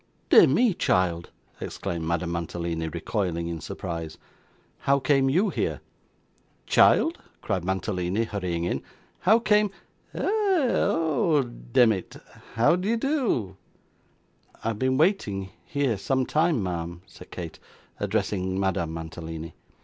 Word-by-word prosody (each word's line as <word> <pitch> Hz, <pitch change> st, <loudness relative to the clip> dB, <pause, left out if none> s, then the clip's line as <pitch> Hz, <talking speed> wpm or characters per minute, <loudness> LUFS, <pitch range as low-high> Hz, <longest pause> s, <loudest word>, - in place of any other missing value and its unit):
'Dear -, -, +9 dB
me, 240 Hz, -5 st, +3 dB
child!' 90 Hz, -, +1 dB, 0.3 s
exclaimed 85 Hz, -1 st, -4 dB
Madame 85 Hz, 0 st, -1 dB
Mantalini, 85 Hz, -1 st, -3 dB
recoiling 85 Hz, 0 st, -2 dB
in 85 Hz, -1 st, -4 dB
surprise. 80 Hz, 0 st, -5 dB, 0.6 s
'How 140 Hz, 0 st, +3 dB
came 135 Hz, -1 st, +2 dB
you 185 Hz, +10 st, +3 dB
here?' -, -, -1 dB, 0.9 s
'Child!' 330 Hz, +2 st, +4 dB, 0.2 s
cried 95 Hz, -5 st, -1 dB
Mantalini, 95 Hz, +2 st, -1 dB
hurrying 90 Hz, -6 st, -3 dB
in. 75 Hz, -6 st, -1 dB, 0.4 s
'How 220 Hz, -, +5 dB
came 210 Hz, -2 st, +3 dB, 0.5 s
eh! -, -, -3 dB
oh 235 Hz, -, +2 dB
demmit, 110 Hz, -, +1 dB, 0.4 s
how 115 Hz, +8 st, +4 dB
d'ye 195 Hz, +6 st, 0 dB
do?' 230 Hz, -, 0 dB, 1.1 s
'I -, -, -2 dB
have 110 Hz, -2 st, -4 dB
been 130 Hz, 0 st, +1 dB
waiting, 110 Hz, -, +1 dB, 0.2 s
here 140 Hz, -, 0 dB
some 130 Hz, +6 st, 0 dB
time, 155 Hz, -, +2 dB
ma'am,' 85 Hz, -1 st, -4 dB
said -, -, -14 dB
Kate, -, -, -7 dB, 0.4 s
addressing 95 Hz, -1 st, -1 dB
Madame 85 Hz, -4 st, -1 dB
Mantalini. 80 Hz, 0 st, -7 dB
100 Hz, 120 wpm, -26 LUFS, -, 1.1 s, Dear